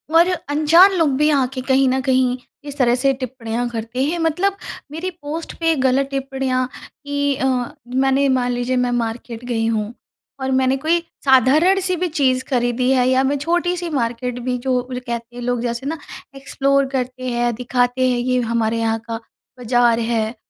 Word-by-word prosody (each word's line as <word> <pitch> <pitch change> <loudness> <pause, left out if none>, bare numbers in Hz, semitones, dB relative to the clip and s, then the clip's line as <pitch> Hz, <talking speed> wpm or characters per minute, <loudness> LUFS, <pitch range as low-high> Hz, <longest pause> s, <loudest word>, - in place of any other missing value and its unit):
और 340 +2 +6 0.2
अनजान 325 +6 +6
लोग 320 -3 +3
भी 300 +1 +3
आके 265 -2 0
कहीं 265 +1 +2
न 260 +1 +1
कहीं 255 -1 +2 0.3
इस 285 +1 -7
तरह 245 -2 +3
से 270 +1 +2
टिप्पणियाँ 245 -2 -4
करते 230 +3 -3
हैं, 335 +4 -1
मतलब 360 +5 0 0.3
मेरी 335 +4 -4
पोस्ट 310 +3 -5
पे 330 -1 +2
गलत 265 0 +2
टिप्पणियाँ 265 -2 -1 0.2
की 285 -1 -3
अ, 265 - -2 0.4
मैंने 270 +2 +2
मान 250 -1 +1
लीजिए 245 +1 -1
मैं 245 - -1
मार्केट 235 0 -3
गई 225 -2 -1
हूँ 220 0 -1 0.5
और 265 0 -2
मैंने 260 +1 +2
कोई 325 +5 +1 0.3
साधारण-सी 330 +9 +4
भी 360 +1 -1
चीज़ 260 -5 +1
खरीदी 245 0 +1
है 255 -1 +3
या 260 +1 +3
मैं 280 +2 +1
छोटी-सी 345 +3 -1
मार्केट 245 -2 -2
भी 250 0 -2
जो 260 +1 -1
वो 250 0 -2
कहते 235 +1 -5
लोग, 245 -1 -1
जैसे 235 +2 -3
ना 320 +3 -2 0.4
एक्सप्लोर 275 0 +1
करते 255 -1 -4
हैं, 240 0 0
दिखाते 245 +1 0
हैं 245 - +1
ये 250 +1 +1
हमारे 230 -1 0
यहाँ 225 0 0
का 225 0 -3 0.4
बाज़ार 240 -1 +3
है 225 0 -1
260 Hz, 175 wpm, -20 LUFS, 245-280 Hz, 0.5 s, और